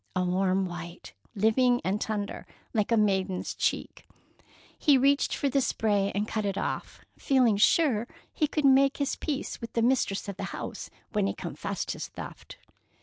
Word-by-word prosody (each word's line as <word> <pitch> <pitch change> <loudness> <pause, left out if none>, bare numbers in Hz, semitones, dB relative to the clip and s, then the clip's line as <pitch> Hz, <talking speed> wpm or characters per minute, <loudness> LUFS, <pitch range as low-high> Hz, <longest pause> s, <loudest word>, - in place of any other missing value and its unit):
A 185 - +1
warm 190 +1 +1
white, 175 - -8 0.2
living 245 +4 +3
and 195 +3 -1
tender, 205 -2 -3 0.3
like 215 0 0
a 230 - +4
maiden's 190 -3 0
cheek. - - -2 0.7
He 285 -3 +4
reached 280 +2 +3
for 285 - 0
the 275 0 +2
spray 205 -5 +1
and 205 +1 0
cut 215 -1 -2
it 200 -1 -2
off, - - -4
feeling 255 -6 +3
sure 240 -1 +3 0.3
he 305 - +1
could 300 0 -1
make 275 0 +5
his 280 -1 -1
peace 285 -4 -4
with 230 - -7
the 230 - +1
mistress 240 -6 +1
of 200 - -5
the - - -3
house - - -6 0.2
when - - +1
he 100 - -2
confessed - - -4
his - - -5
theft. - - -10
215 Hz, 170 wpm, -28 LUFS, 195-265 Hz, 0.7 s, make